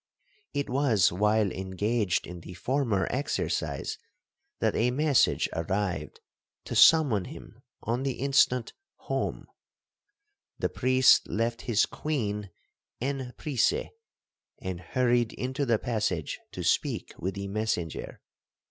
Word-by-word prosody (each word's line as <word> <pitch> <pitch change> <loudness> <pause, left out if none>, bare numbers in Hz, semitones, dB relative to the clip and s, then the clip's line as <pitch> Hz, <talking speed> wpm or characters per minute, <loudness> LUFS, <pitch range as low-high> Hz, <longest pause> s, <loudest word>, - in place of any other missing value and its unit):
It 140 - 0
was 125 -7 +3
while 105 +2 +2
engaged 95 +2 -1
in 90 0 -8
the 90 - -10
former 120 -2 0
exercise, 140 +3 -2 0.6
that - - 0
a 120 - +2
message 145 +1 +3
arrived 95 +3 -2 0.5
to - - -5
summon 135 - +6
him - - -11 0.2
on 120 +3 -1
the 135 -1 -1
instant 130 -2 +2 0.2
home,—the 410 0 -7
priest 130 0 +4
left 115 +2 -1
his 115 -1 +4
queen 105 -10 -3 0.5
en 130 -1 -3
prise, 140 -7 0 0.7
and 95 -2 -5
hurried 120 +5 +1
into 130 +2 -2
the 115 -2 +3
passage 105 - -2
to - - -6
speak - - 0
with 95 +3 -3
the 100 0 -4
messenger. 100 -5 -3
115 Hz, 110 wpm, -28 LUFS, 100-130 Hz, 0.7 s, summon